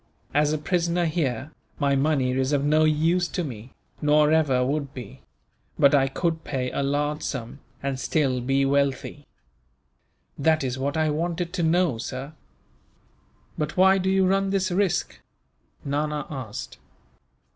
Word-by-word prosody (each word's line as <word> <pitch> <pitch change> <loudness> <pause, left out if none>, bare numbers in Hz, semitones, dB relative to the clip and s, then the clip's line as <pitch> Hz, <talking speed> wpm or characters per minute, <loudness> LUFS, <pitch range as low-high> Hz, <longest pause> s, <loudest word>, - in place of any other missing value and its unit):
"As 150 0 +3
a 155 - 0
prisoner 170 +2 0
here, 150 -4 -2 0.3
my 140 -2 +2
money 135 -2 +1
is 130 +2 0
of 140 0 +1
no 155 +1 +4
use 165 +4 +2
to 180 - -3
me, 120 -4 -8 0.3
nor 150 0 +4
ever 140 -6 +3
would 140 0 -2
be; 125 -6 -9 0.6
but 140 0 +5
I 135 -2 +4
could 165 +3 -2
pay 125 -3 -3
a - - -2
large 145 +2 -1
sum, 125 -1 -5 0.2
and 135 -1 -2
still 135 -4 0
be 135 +2 +1
wealthy." 140 0 -1 1.1
"That 155 +1 +2
is 130 0 -3
what 140 +3 -1
I 155 -1 +2
wanted 170 +3 -2
to 190 - -1
know, 165 -6 +2
sir." 135 +5 -6 1.3
"But 150 +2 -3
why 190 +1 +5
do 190 0 0
you 190 0 +3
run 195 +1 +2
this 190 -1 0
risk?" 185 -1 0 0.6
Nana 150 0 -1
asked. 130 -7 -7
150 Hz, 150 wpm, -25 LUFS, 135-165 Hz, 1.3 s, but